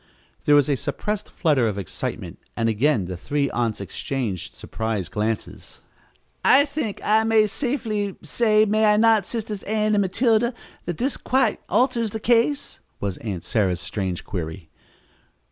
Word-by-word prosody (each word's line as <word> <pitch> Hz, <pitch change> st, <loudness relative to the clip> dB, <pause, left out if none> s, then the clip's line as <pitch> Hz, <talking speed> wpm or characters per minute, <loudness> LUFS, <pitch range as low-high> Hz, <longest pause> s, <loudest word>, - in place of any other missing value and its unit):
'" -, -, -36 dB
There 145 Hz, -, +6 dB
was 145 Hz, -2 st, +5 dB
a 145 Hz, -, +2 dB
suppressed 190 Hz, +10 st, -3 dB
flutter 145 Hz, -8 st, +2 dB
of 105 Hz, -2 st, -2 dB
excitement 95 Hz, -5 st, -5 dB, 0.2 s
and 115 Hz, -1 st, +1 dB
again 115 Hz, -1 st, +2 dB
the 90 Hz, +1 st, -5 dB
three 140 Hz, +10 st, -1 dB
aunts 115 Hz, -3 st, -1 dB
exchanged 100 Hz, -1 st, -4 dB
surprised 110 Hz, -6 st, -4 dB
glances. 110 Hz, +1 st, -4 dB, 0.6 s
"I 280 Hz, +2 st, +6 dB
think 280 Hz, -8 st, -4 dB
I 220 Hz, +1 st, +4 dB
may 220 Hz, -1 st, +4 dB
safely 215 Hz, -5 st, -2 dB
say, 215 Hz, +6 st, +3 dB
may 215 Hz, +1 st, +2 dB
I 210 Hz, -, +3 dB
not, 220 Hz, -1 st, +4 dB
Sisters 215 Hz, -3 st, -4 dB
Ann 215 Hz, 0 st, 0 dB
and 205 Hz, -, +3 dB
Matilda, 230 Hz, +4 st, +2 dB, 0.3 s
that 175 Hz, -2 st, -3 dB
this 265 Hz, +3 st, -1 dB
quite 255 Hz, -4 st, +1 dB
alters 235 Hz, 0 st, +2 dB
the 220 Hz, -, -5 dB
case?" 240 Hz, +6 st, +1 dB, 0.2 s
was 100 Hz, -3 st, -3 dB
Aunt 100 Hz, -7 st, -5 dB
Sarah's 95 Hz, -6 st, 0 dB
strange 95 Hz, -1 st, -3 dB
query. 80 Hz, -2 st, -6 dB
190 Hz, 155 wpm, -23 LUFS, -, 0.6 s, There